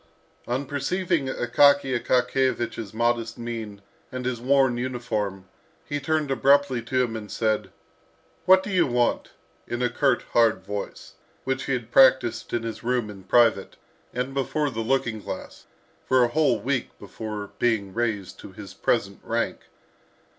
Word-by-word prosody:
On 130 Hz, +4 st, -1 dB
perceiving 150 Hz, +2 st, -1 dB
Akaky 135 Hz, +2 st, +3 dB
Akakiyevich's 125 Hz, -3 st, 0 dB
modest 115 Hz, 0 st, 0 dB
mien 115 Hz, -4 st, -6 dB, 0.3 s
and 130 Hz, -1 st, -5 dB
his 125 Hz, -2 st, -2 dB
worn 135 Hz, -1 st, +3 dB
uniform, 110 Hz, -6 st, -3 dB, 0.4 s
he 145 Hz, -, -3 dB
turned 150 Hz, 0 st, -1 dB
abruptly 140 Hz, -2 st, +3 dB
to 125 Hz, +2 st, 0 dB
him, 115 Hz, -2 st, -3 dB
and 105 Hz, -2 st, -7 dB
said, 110 Hz, -3 st, 0 dB, 0.8 s
"What 185 Hz, 0 st, +6 dB
do 205 Hz, -, -5 dB
you 180 Hz, -4 st, +3 dB
want?" 120 Hz, -1 st, 0 dB, 0.4 s
in 120 Hz, +1 st, -2 dB
a 120 Hz, -, +1 dB
curt 140 Hz, +2 st, +1 dB
hard 110 Hz, -5 st, +3 dB
voice, 100 Hz, 0 st, -6 dB, 0.3 s
which 135 Hz, 0 st, -2 dB
he 135 Hz, -, -1 dB
had 120 Hz, -2 st, -4 dB
practised 130 Hz, -3 st, +4 dB
in 120 Hz, -1 st, -1 dB
his 115 Hz, -2 st, -6 dB
room 120 Hz, -3 st, 0 dB
in 95 Hz, -2 st, -13 dB
private, 115 Hz, +3 st, +3 dB, 0.4 s
and 125 Hz, +2 st, -3 dB
before 140 Hz, +2 st, -1 dB
the 115 Hz, -2 st, -3 dB
looking 120 Hz, -2 st, 0 dB
glass, 95 Hz, -, -8 dB, 0.4 s
for 130 Hz, -1 st, +4 dB
a 120 Hz, -, +2 dB
whole 145 Hz, -4 st, +2 dB
week 130 Hz, +3 st, -2 dB
before 105 Hz, -2 st, -7 dB
being 105 Hz, -5 st, 0 dB
raised 110 Hz, -5 st, -2 dB
to -, -, -11 dB
his -, -, -10 dB
present -, -, -1 dB
rank. -, -, -2 dB
120 Hz, 150 wpm, -25 LUFS, 115-135 Hz, 0.8 s, What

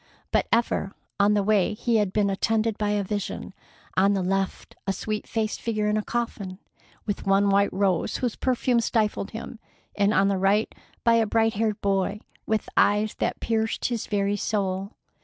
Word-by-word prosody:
But -, -, +2 dB
ever 230 Hz, -4 st, +1 dB, 0.3 s
on 205 Hz, +1 st, +4 dB
the 205 Hz, -, +2 dB
way 210 Hz, 0 st, +2 dB
he 230 Hz, +1 st, +1 dB
had 205 Hz, -3 st, +1 dB
been 200 Hz, -1 st, +1 dB
attended 220 Hz, +2 st, +1 dB
by 210 Hz, -1 st, 0 dB
a 205 Hz, -1 st, +1 dB
vision, 200 Hz, -1 st, -4 dB, 0.4 s
on 195 Hz, +2 st, +4 dB
the 190 Hz, -, 0 dB
left 195 Hz, +1 st, -2 dB
a 195 Hz, -, +1 dB
sweet 215 Hz, +2 st, -4 dB
faced 220 Hz, -1 st, -2 dB
figure 215 Hz, -2 st, -1 dB
in 210 Hz, -, +1 dB
a 215 Hz, -, +1 dB
coffin, 210 Hz, -5 st, -3 dB, 0.5 s
with 205 Hz, -2 st, -3 dB
one 195 Hz, +1 st, +4 dB
white 200 Hz, +1 st, +3 dB
rose 190 Hz, -3 st, 0 dB
whose 245 Hz, -4 st, -2 dB
perfume 250 Hz, -1 st, +1 dB
stifled 215 Hz, -4 st, 0 dB
him, 225 Hz, +1 st, -8 dB, 0.4 s
and 205 Hz, 0 st, +3 dB
on 195 Hz, -1 st, +3 dB
the 195 Hz, -1 st, +1 dB
right 200 Hz, +3 st, +2 dB, 0.3 s
by 235 Hz, -, +5 dB
a 220 Hz, -, +1 dB
bright 225 Hz, +1 st, +2 dB
haired 215 Hz, 0 st, 0 dB
boy 195 Hz, +1 st, 0 dB, 0.3 s
with 220 Hz, 0 st, 0 dB
eyes 210 Hz, +1 st, +3 dB
that -, -, -1 dB
pierced 225 Hz, -1 st, -1 dB
his 235 Hz, -3 st, -3 dB
very 200 Hz, -1 st, 0 dB
soul. 195 Hz, -1 st, -2 dB
210 Hz, 180 wpm, -25 LUFS, 195-220 Hz, 0.5 s, by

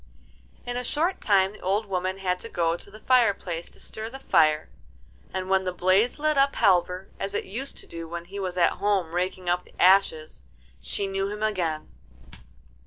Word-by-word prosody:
In 245 Hz, 0 st, -3 dB
a 250 Hz, -, -2 dB
short 330 Hz, +9 st, 0 dB
time 195 Hz, -2 st, +3 dB
the 215 Hz, -, -14 dB
old 200 Hz, +4 st, 0 dB
woman 185 Hz, -1 st, -2 dB
had 180 Hz, -2 st, -1 dB
to 230 Hz, -, -5 dB
go 170 Hz, -3 st, +1 dB
to 175 Hz, -, -11 dB
the 215 Hz, +2 st, -13 dB
fireplace 200 Hz, -9 st, +2 dB
to -, -, -16 dB
stir 220 Hz, +1 st, -5 dB
the 265 Hz, -, -8 dB
fire, 155 Hz, -, +3 dB, 0.6 s
and 185 Hz, 0 st, -3 dB
when 190 Hz, 0 st, +2 dB
the 185 Hz, -, -1 dB
blaze 185 Hz, +6 st, +2 dB
lit 305 Hz, -1 st, +1 dB
up 275 Hz, 0 st, +3 dB
Halvor, 180 Hz, 0 st, +2 dB
as 195 Hz, +1 st, -3 dB
it -, -, -1 dB
used 255 Hz, +8 st, -5 dB
to -, -, -6 dB
do 165 Hz, 0 st, -8 dB
when 170 Hz, +1 st, -6 dB
he 200 Hz, +3 st, -7 dB
was 185 Hz, -2 st, -3 dB
at 170 Hz, -, +2 dB
home 195 Hz, -5 st, +1 dB
raking 180 Hz, +1 st, -2 dB
up 180 Hz, +1 st, +1 dB
the -, -, -22 dB
ashes, 180 Hz, -, +3 dB, 0.4 s
she 200 Hz, -, -2 dB
knew 195 Hz, 0 st, -2 dB
him 210 Hz, +1 st, -5 dB
again. 175 Hz, -8 st, -1 dB
190 Hz, 195 wpm, -26 LUFS, 180-210 Hz, 0.6 s, time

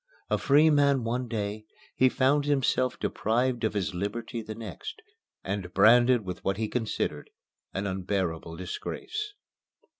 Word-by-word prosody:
A -, -, +2 dB
free 150 Hz, +3 st, +5 dB
man 140 Hz, -3 st, +3 dB
one 120 Hz, +2 st, -1 dB
day, 105 Hz, -1 st, -3 dB, 0.3 s
he 130 Hz, -, +5 dB
found 140 Hz, +3 st, +2 dB
himself 130 Hz, -3 st, +1 dB
deprived 120 Hz, +2 st, 0 dB
of 110 Hz, -1 st, 0 dB
his 100 Hz, 0 st, -1 dB
liberty 105 Hz, +5 st, -3 dB
the 110 Hz, 0 st, -7 dB
next, 115 Hz, -, -7 dB, 0.4 s
and 95 Hz, -2 st, -3 dB
branded 120 Hz, 0 st, +6 dB
with 90 Hz, -1 st, -6 dB
what 95 Hz, 0 st, 0 dB
he 110 Hz, 0 st, -1 dB
considered 115 Hz, -3 st, -2 dB, 0.4 s
an 95 Hz, +2 st, -3 dB
unbearable 95 Hz, -4 st, -2 dB
disgrace. 420 Hz, -, -5 dB
115 Hz, 140 wpm, -28 LUFS, 100-130 Hz, 0.4 s, branded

